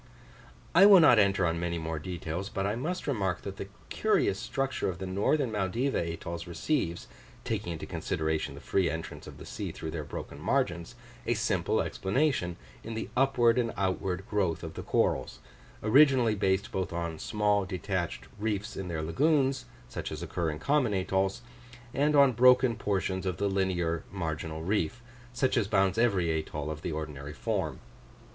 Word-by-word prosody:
I 190 +4 +8
will 200 -2 +9
not 135 -9 +7
enter 100 -2 +3
on 85 0 0
many 85 0 -2
more 80 -1 -3
details; 85 +3 -4
but 95 - -2
I 100 +2 0
must 160 +10 -3
remark 100 - -1
that 100 -1 -6
the 100 - -5 0.2
curious - - +1
structure 135 -5 -1
of 90 - -4
the 95 - -5
northern 110 +8 +1
Maldiva 110 +7 0
atolls 85 0 -4
receives 85 - -1 0.4
(taking 85 - -2
into 80 - -6
consideration 80 -2 -2
the 70 - -10
free 95 -3 +1
entrance 80 +2 -6
of - - -10
the - - -10
sea - - -5
through 80 - -6
their 80 -2 -4
broken 70 0 -7
margins) 95 - 0 0.3
a 120 - +2
simple 105 -6 +1
explanation 100 - 0 0.3
in 115 0 -6
the 110 - -4
upward 125 -3 +4
and 115 -2 0
outward 95 -1 -1
growth 95 -8 0
of 80 -1 -6
the - - -6
corals, - - 0 0.5
originally 125 0 +5
based 95 -1 0
both 95 -2 -2
on 85 -2 -3
small 105 -1 +1
detached 95 -2 -3
reefs 105 0 -2
in 95 - -5
their 80 -3 -3
lagoons, 135 - +2 0.2
such - - -5
as 80 +2 -5
occur 85 -1 -2
in 75 - -4
common 130 - +1
atolls, 95 +3 0 0.5
and 150 +2 +2
on 140 -2 +7
broken 125 0 +5
portions 95 -3 -1
of 90 -3 -2
the 100 - 0
linear 90 -4 0
marginal 80 -3 -4
reef, 105 +5 -1 0.3
such 130 +1 +1
as 115 -5 +2
bounds 95 +1 +2
every 95 -8 +2
atoll 75 -1 -3
of 75 0 -6
the 85 - -3
ordinary 75 -2 -5
form. - - -2
95 Hz, 170 wpm, -29 LUFS, 85-120 Hz, 0.5 s, will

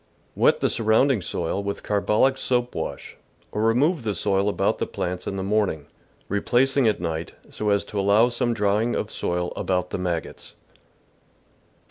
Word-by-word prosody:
— - - -38
Wet - - +4
the - - +2
surrounding 115 +2 +3
soil 85 +2 -2
with 100 0 -4
car 105 -1 0
bolic 130 +7 +3
soap 125 -2 0
wash, - - -6 0.3
or 105 - -2
remove 130 +9 +2
the 105 -3 -2
soil 100 +1 +1
about - - 0
the - - -1
plants 90 0 -4
in 95 - -3
the 95 - -3
morning, 100 -7 0 0.4
replacing 125 +6 +2
at 110 - +1
night, 80 -1 -4 0.2
so 105 - -2
as 100 0 +2
to 105 - -4
allow 100 +4 +4
some 120 0 0
drying 105 +3 +1
of - - -3
soil 90 0 -2
about 90 -1 -1
the - - -3
maggots. 85 -3 -4
105 Hz, 170 wpm, -24 LUFS, 95-120 Hz, 0.4 s, Wet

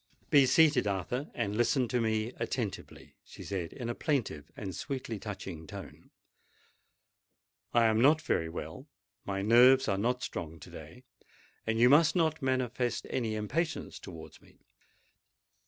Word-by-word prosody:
"Be 140 -3 +6
seated, 155 -3 +4
Arthur—and 100 - -3
listen 120 +2 +2
to 125 -2 0
me 110 0 0
attentively," 110 -7 -5
she - - -12
said 90 -4 -4
in 120 - -6
a 120 - -1
plaintive 115 - -2
and 95 -8 -5
sweetly 125 -2 -5
touching 90 -7 -7
tone. - - -10 1.6
"I 120 -1 +4
am 110 0 +3
not 150 +5 +5
very 80 - -1
well—my 95 +3 -7
nerves 125 +5 +6
are 95 - 0
not 125 +4 0
strong 80 -2 -5
to - - -11
day—and 110 0 -9
you 120 +2 +6
must 150 +5 +5
not 160 -3 +1
manifest 130 -2 -1
any 115 -4 -1
impatience 155 +11 -3
towards 80 -3 -11
me. - - -23
120 Hz, 135 wpm, -30 LUFS, 100-130 Hz, 1.6 s, Be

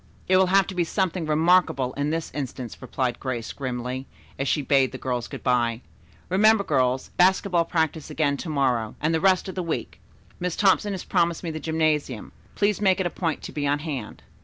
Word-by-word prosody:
"It 185 - +4
will 190 0 +5
have 195 +1 +4
to 195 - -6
be 180 -1 +1
something 180 -1 -1
remarkable 155 -4 +3
in 145 +1 -1
this 165 +1 -3
instance," 130 -4 -6
replied 130 -1 -2
Grace 120 -4 -4
grimly, 130 0 -4 0.3
as 135 - -1
she 145 +3 +1
bade 135 -1 +3
the 130 - -6
girls 125 -2 -3
good - - -9
bye. 120 -2 +1 0.5
"Remember, 210 +3 +4
girls, 130 -5 0
basketball 180 -1 +3
practice 160 -2 -1
again 145 -3 +1
to 160 - -6
morrow, 125 -7 0
and 155 +2 0
the 160 - +1
rest 190 0 +3
of 190 - -5
the 185 - -3
week. 165 -2 -4 0.4
Miss 180 -1 -2
Thompson 205 0 +3
has 190 - -5
promised 170 0 0
me 165 - -3
the 155 - -5
gymnasium. 155 -6 -1 0.2
Please 205 0 +1
make 190 -2 +3
it 190 - 0
a 175 - -1
point 165 -4 -2
to - - -6
be 145 -1 -2
on 145 +1 +2
hand." 145 -7 -6
155 Hz, 205 wpm, -25 LUFS, 130-180 Hz, 0.5 s, will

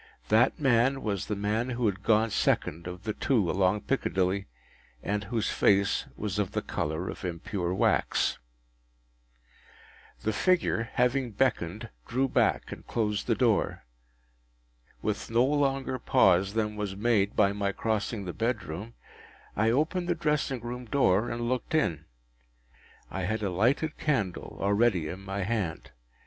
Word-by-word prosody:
That 115 +4 +4
man 135 0 +3
was 100 -4 -2
the 105 - -1
man 105 +5 -1
who 125 -1 -1
had 100 -2 0
gone 110 +1 +3
second 85 -2 0
of 90 +1 -7
the 110 - -2
two 105 -10 +1
along 95 +2 +2
Piccadilly, 95 -6 0 0.6
and 105 +1 -1
whose 115 -3 -1
face 100 0 +3
was 105 -1 -3
of 100 -3 -1
the - - -1
colour 80 +4 -3
of - - -6
impure 90 +1 -3
wax. 95 - +1 1.8
The 110 - 0
figure, 165 - +1
having 125 -1 +1
beckoned, 105 -5 0 0.2
drew 130 +3 +1
back, - - +1
and - - -9
closed 105 -3 -1
the - - +2
door. - - +1 1.2
With - - -2
no 115 +2 +4
longer 135 -2 0
pause 100 -6 +3
than 105 -1 0
was 105 -2 -3
made 105 -2 +1
by 100 -1 +4
my 100 -1 -1
crossing 110 0 -2
the 90 - -4
bedroom, 110 -2 -3 0.6
I 110 +3 +2
opened 155 +8 +1
the 175 - +2
dressing 150 -6 0
room 125 +1 -6
door, 110 -4 +2
and 120 +1 -3
looked 130 +5 -1
in. 85 - 0 1.1
I 95 -1 -3
had 110 +2 -2
a 100 - 0
lighted 130 - +1
candle 115 - -1
already 100 -4 +2
in 95 - -6
my 95 0 -3
hand. 100 -6 -3
110 Hz, 145 wpm, -28 LUFS, 95-125 Hz, 1.8 s, That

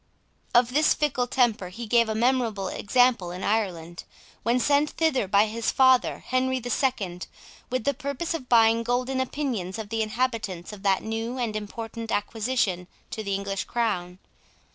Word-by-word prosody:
Of 240 0 +4
this 305 +2 +4
fickle 270 -5 0
temper 235 -8 +1
he 230 +6 -7
gave 230 0 +3
a 220 - -1
memorable 230 -5 +1
example 245 -4 +2
in 180 +2 -6
Ireland, 175 -6 -2 0.4
when 235 +2 +1
sent 290 +3 +3
thither 295 -10 0
by 200 +2 +4
his 225 +2 -2
father, 260 -1 +3
Henry 260 0 +1
the 245 -1 -5
Second, 200 -10 -1 0.4
with 255 -2 -1
the 280 - +1
purpose 280 +4 -3
of 275 -6 -6
buying 230 -1 +5
golden 250 +2 -1
opinions 245 -9 -3
of 220 -2 -6
the 225 +1 -1
inhabitants 220 -5 -2
of 205 - -10
that 195 -1 +2
new 225 +3 -3
and 235 -4 -2
important 225 +2 -6
acquisition 205 -4 -1 0.2
to 220 - -4
the 200 -1 -1
English 195 0 -3
crown. 185 -7 -2
230 Hz, 165 wpm, -26 LUFS, 200-255 Hz, 0.4 s, buying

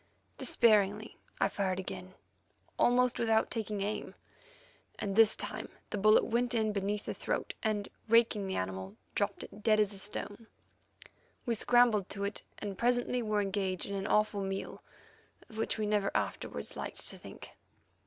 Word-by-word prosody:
Despairingly 210 -1 +2 0.2
I - - +4
fired 190 -2 -1
again, 185 0 -7 0.6
almost 250 0 +3
without 225 -1 +2
taking 215 -3 -2
aim, 210 +2 -3 0.8
and 195 -1 -2
this 225 -1 +6
time - - -3 0.2
the 210 - -1
bullet 215 +2 +6
went 240 +1 +1
in 220 -2 +1
beneath 205 +1 -2
the - - -3
throat, - - -2
and, 210 -2 0 0.2
raking 225 -3 +4
the 190 - -2
animal, 95 +1 -4 0.2
dropped 200 -1 -1
it 205 - -11
dead 215 0 +4
as 210 -1 +2
a 195 - -7
stone. 205 +2 -5 1.0
We 240 - +1
scrambled 230 -3 +4
to 200 0 -4
it, 200 +1 -3 0.2
and 200 -3 -6
presently 245 +1 +2
were 215 -2 +1
engaged 195 -2 -1
in 200 - -5
an 195 0 -2
awful 210 -1 +2
meal 195 0 -4 0.7
of 220 - -9
which 225 - 0
we 215 - -1
never 205 -1 +1
afterwards - - -3
liked - - -4
to - - -8
think. - - -11
210 Hz, 160 wpm, -32 LUFS, 195-225 Hz, 1.0 s, this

